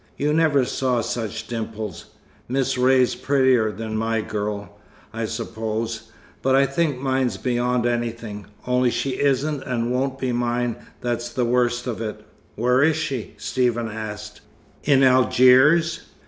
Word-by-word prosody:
You 150 +1 +1
never 155 -5 +3
saw 125 -2 0
such 115 -2 -4
dimples. 110 -5 -5 0.4
Miss 130 +1 0
Ray's 130 0 +3
prettier 130 -5 +2
than 110 +2 -5
my 115 +1 0
girl, 105 -1 -5 0.3
I 115 0 -2
suppose. 110 0 -4 0.3
But 130 0 +2
I 135 +1 +5
think 140 0 0
mine's 130 -5 0
beyond 125 +1 0
anything. 115 -3 -3 0.2
Only 125 0 +2
she 125 +2 -2
isn't 140 +1 +1
and 120 -2 -2
won't 130 +1 -1
be 130 -2 -2
mine 120 0 -1 0.2
that's 120 0 -2
the 125 - -1
worst 120 0 +1
of 120 -3 -4
it." 110 -2 -5 0.3
"Where 125 +3 +2
is 160 +1 +4
she?" 140 -7 -4
Stephen 120 -3 0
asked. 105 -1 -7 0.4
"In 135 -2 +4
Algiers?" 130 +6 +5
125 Hz, 140 wpm, -23 LUFS, 115-130 Hz, 0.4 s, I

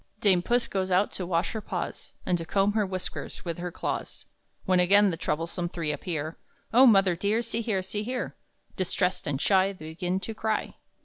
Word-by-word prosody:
Dame 195 -5 +4
Puss 240 +6 +1
goes 190 -1 -2
out 185 +3 +3
to 180 - -4
wash 170 -1 0
her 220 - -4
paws, - - -5
And 180 - +2
to - - -3
comb 195 +4 +2
her 210 -2 +1
whiskers 185 0 -5
with 170 -1 -3
her 175 0 -4
claws, - - -4 0.4
When 185 -1 +3
again 200 +2 +5
the - - -2
troublesome 165 +3 -2
three 165 -3 -2
appear; 155 +1 -4 0.3
"Oh 260 +3 +8
mother 195 -5 +5
dear, 205 +6 0
see 230 - -1
here 210 -5 0
see 205 +3 -2
here!" 245 +3 -3 0.4
Distressed 185 -1 0
and 140 -2 -1
shy 195 +3 +3
They 155 -4 -9
begin 180 +3 -2
to 225 - -5
cry. 220 0 -2
185 Hz, 195 wpm, -27 LUFS, 175-205 Hz, 0.4 s, Oh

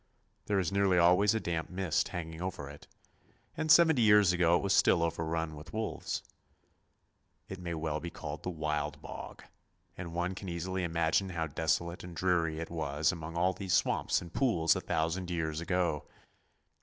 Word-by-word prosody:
There 105 - +1
is 95 -2 0
nearly 100 -2 +3
always 90 +5 +5
a - - +1
damp 85 -5 -3
mist 90 -3 0
hanging 80 -2 -6
over 90 -6 -4
it, 70 0 -12 0.7
and 155 -1 0
seventy 160 -5 +6
years 105 -4 +6
ago 85 -1 +3
it - - -4
was 100 -1 +2
still 85 -3 +4
overrun 80 -1 -2
with 75 +2 -11
wolves. 110 0 -3 1.2
It 95 - -7
may 85 -2 -4
well 80 -1 -2
be 85 - -5
called 75 -2 -7
the - - -4
Wild 75 -3 -2
Bog, - - -9 0.5
and 85 -2 -7
one 90 +2 -1
can 95 0 -7
easily 90 +2 -3
imagine 85 +3 +1
how 85 -3 -2
desolate 80 +3 -1
and 90 -1 -9
dreary 85 -3 +1
it 80 - -6
was 75 -2 0
among 85 -1 -6
all 90 +2 +2
these 95 0 -1
swamps - - +1
and 85 - -12
pools 90 - +3
a - - -2
thousand 85 +3 -1
years 80 -2 -2
ago. 85 -4 -1
85 Hz, 175 wpm, -31 LUFS, 80-95 Hz, 1.2 s, seventy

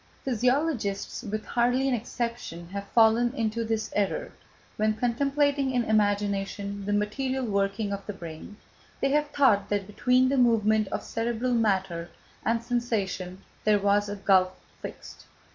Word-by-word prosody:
Physiologists, 250 -4 0
with 215 -2 -4
hardly 245 +3 +1
an 265 - +1
exception, 235 -7 -4
have 200 +1 -5
fallen 230 +2 +4
into 230 -2 -1
this 225 -1 -2
error; 210 - 0 0.4
when 215 0 +1
contemplating 275 +4 +1
in 250 -2 +1
imagination 200 -1 0
the - - 0
material 255 +6 -1
working 200 0 0
of 200 0 -5
the 210 - -3
brain, 170 +2 -9 0.4
they 275 - +1
have 295 +1 +2
thought 245 -10 +3
that 205 -1 0
between 250 +5 +2
the 275 +1 +1
movement 220 -3 +3
of - - -4
cerebral 235 +2 -1
matter 190 -7 0 0.3
and 230 0 0
sensation 200 -6 -2 0.2
there 210 -1 +4
was 205 +1 +2
a 205 - -3
gulf 190 -2 +3 0.3
fixed. - - -9
220 Hz, 145 wpm, -27 LUFS, 200-245 Hz, 0.4 s, fallen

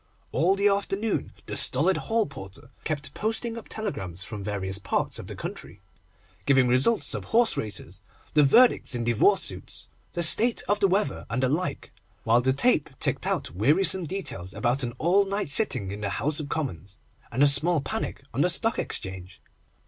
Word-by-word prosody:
All 185 +4 +2
the 200 +1 +2
afternoon 200 +1 -1
the - - -6
stolid 165 +9 +3
hall 225 -1 0
porter 100 -2 -11
kept 150 -2 -4
posting 225 +2 -2
up 230 - -9
telegrams 95 - -5
from 105 -1 -8
various 95 -1 -3
parts 100 - -2
of - - -9
the - - -8
country 95 - -8 0.7
giving 135 -2 +4
the 120 - 0
results 135 - +2
of - - -4
horse 230 0 +3
races, 100 -4 -6 0.3
the 150 - +5
verdicts 190 - +4
in 120 - -2
divorce 120 -2 +3
suits, - - -3 0.3
the 175 - -1
state 230 +9 +4
of 205 +1 +1
the 200 - +4
weather, 190 -6 -1
and 130 - -2
the 130 - +2
like, 170 +6 -3 0.3
while 115 +2 +3
the 130 +1 +1
tape 150 - +2
ticked - - -1
out - - -1
wearisome 165 - +2
details 95 - -6
about 120 +6 0
an 120 -2 -2
all 185 +5 +3
night 195 -5 -2
sitting 125 - +4
in 105 +1 -6
the 100 - -2
House 150 +9 -1
of 145 -2 -6
Commons, 100 - -5 0.3
and 130 +5 +2
a - - +7
small 155 +4 +5
panic 140 - -4
on - - 0
the - - +3
Stock - - +2
Exchange. 95 0 -5
140 Hz, 185 wpm, -26 LUFS, -, 0.7 s, a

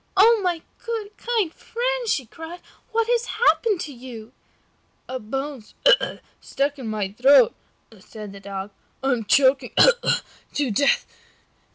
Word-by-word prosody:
"Oh, 450 +3 +6
my 350 -3 -1 0.2
good, 435 -3 -4
kind 445 -8 -1
friend," - - -3
she 265 - 0
cried, 325 +8 -10 0.3
"what 455 0 +1
has 480 0 +1
happened 445 -4 +3
to 295 - -6
you?" 240 -2 -10 0.7
"A 260 0 -4
bone 270 +3 -5 0.4
has - - -4 0.2
stuck 280 +1 -2
in 250 - -6
my 210 -3 -2
throat," 255 +3 +5 0.5
said 210 +1 -10
the 200 - -10
Dog, 195 0 -6 0.3
"and 270 - +2
I - - +4
am 225 - -6
choking 265 +4 +3 0.8
to 285 -5 0
death." 280 +7 +2
280 Hz, 145 wpm, -23 LUFS, -, 0.8 s, Oh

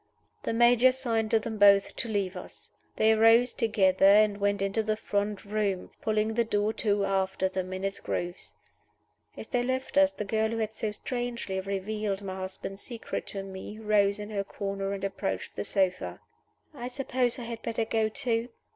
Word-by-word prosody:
_" - - -38
The - - 0
Major 240 +2 +5
signed 230 -4 -1
to 225 - +4
them 220 0 -4
both 200 -1 +6
to 235 - -1
leave 200 -3 -1
us. 180 - -10 0.2
They 220 0 +4
rose 225 +3 +5
together, 195 -4 +2
and 205 0 +5
went 200 0 +1
into 195 +3 0
the 215 0 -1
front 205 -1 -2
room, 200 -2 -1
pulling 215 0 0
the 235 +1 +2
door 215 -1 0
to 205 -2 +2
after 190 -1 0
them 185 0 -4
in 185 +1 -5
its 195 0 -2
grooves. 175 +1 -4 0.8
As - - -7
they 245 - +1
left 260 +3 0
us, 290 0 +5
the 210 -7 -5
girl 220 +2 +1
who 230 - -3
had 220 -1 -2
so 220 0 -2
strangely 235 -2 -3
revealed 200 +1 -3
my 190 -1 -5
husband's 190 +1 -6
secret 235 -3 -5
to 195 -1 -4
me 195 +2 -8
rose 210 -2 +2
in 210 +1 -7
her 200 -2 -1
corner 195 0 -4
and 195 -1 -5
approached 95 - -3
the 100 - -3
sofa. 185 - 0 0.5
"I 245 -4 -6
suppose 255 -1 0
I 245 - -6
had 230 -1 -6
better 225 0 -1
go 220 -1 +1
too?" 235 -1 -1
210 Hz, 190 wpm, -28 LUFS, 195-230 Hz, 0.8 s, both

